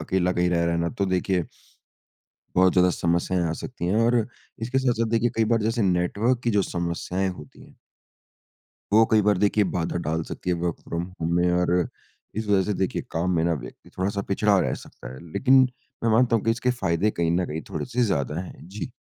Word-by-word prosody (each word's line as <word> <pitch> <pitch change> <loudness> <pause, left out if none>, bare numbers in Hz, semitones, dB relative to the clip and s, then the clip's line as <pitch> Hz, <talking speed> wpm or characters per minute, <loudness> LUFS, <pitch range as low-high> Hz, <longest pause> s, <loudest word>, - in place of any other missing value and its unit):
अकेला 90 +2 +1
कहीं 90 0 +1
रह 85 -1 +2
रहा 85 0 +1
ना 85 0 0
तो 100 - +2
देखिए 95 -1 0 1.1
बहुत 95 0 +5
ज़्यादा 90 0 +4
समस्याएँ 85 +1 0
आ - - -1
सकती 125 -9 -5
हैं 95 +4 +1
और 120 - +3 0.5
इसके 130 +3 0
साथ-साथ 120 -3 +1
देखिए 115 +1 +2
कई 115 - +3
बार 115 - +1
जैसे 115 +1 0
नेटवर्क 100 +7 +1
की 120 - +2
जो 105 -3 +2
समस्याएँ 90 +2 -2
होती 80 -5 -10
हैं। - - -18 1.2
वो 110 +1 +7
कई 110 -1 +5
बार 105 -2 +2
देखिए 105 +1 +3
बाधा 85 0 -1
डाल 80 +1 0
सकती 90 - -5
हैं 90 - +1
वर्क़ 85 -1 -2
फ्रॉम 85 0 -3 0.2
होम 85 +1 -1
में 90 0 +3
और 90 0 +1 0.7
इस 110 0 -2
वज़ह 100 -2 +3
से 105 - -1
देखिए 95 - -1
काम 85 +3 -1
में 80 - +2
ना 85 - +2
व्यक्ति 60 -4 -10
थोड़ा-सा 100 +2 -1
पिछड़ा 100 0 +3
रह - - 0
सकता - - -11
है। 65 - -10
लेकिन 135 0 +5 0.4
मैं 115 - +3
मानता 115 +1 +4
हूँ 110 - -3
कि 115 - +3
इसके 115 +2 +1
फ़ायदे 100 -4 0
कहीं 85 -4 -1
न 90 +1 +1
कहीं 80 +2 -5
थोड़े-से 125 0 -2
ज़्यादा 80 - 0
हैं। 90 - -10
जी। 105 +6 -6
95 Hz, 210 wpm, -25 LUFS, 85-110 Hz, 1.2 s, वो